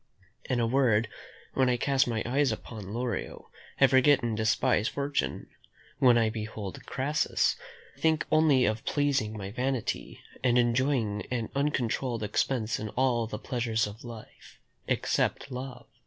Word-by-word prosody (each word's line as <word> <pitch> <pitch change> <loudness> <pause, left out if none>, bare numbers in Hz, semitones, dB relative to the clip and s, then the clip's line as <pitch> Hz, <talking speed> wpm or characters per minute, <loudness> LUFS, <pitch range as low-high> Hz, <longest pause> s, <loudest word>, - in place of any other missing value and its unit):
In 125 - 0
a 115 - +2
word 115 -3 +2 0.4
when 130 -1 +3
I 125 - +2
cast 135 +1 +2
my 115 -2 -1
eyes 135 +2 +2
upon 110 -2 -7
Lorio, 120 -2 -4 0.3
I 135 - +8
forget 130 +1 +4
and 115 -2 -1
despise 110 +1 +2
fortune; 140 +1 -2 0.5
when 125 -4 +6
I 115 -2 +2
behold 110 -3 -6
Crassus, 140 +3 +1 0.4
I - - -22
think 160 -1 +2
only 155 -5 +5
of 110 +1 -1
pleasing 140 -7 0
my 100 -1 -6
vanity, 125 +1 -2 0.2
and 125 -1 +3
enjoying 120 -3 +1
an 115 -3 -2
uncontrolled 130 -4 -1
expense 110 +1 0
in 110 - -4
all 125 -3 +2
the 105 - -5
pleasures 115 -1 -1
of 105 +1 -9
life, 115 -3 -12 0.3
except - - 0
love." 130 +1 -6
120 Hz, 145 wpm, -29 LUFS, 110-135 Hz, 0.5 s, I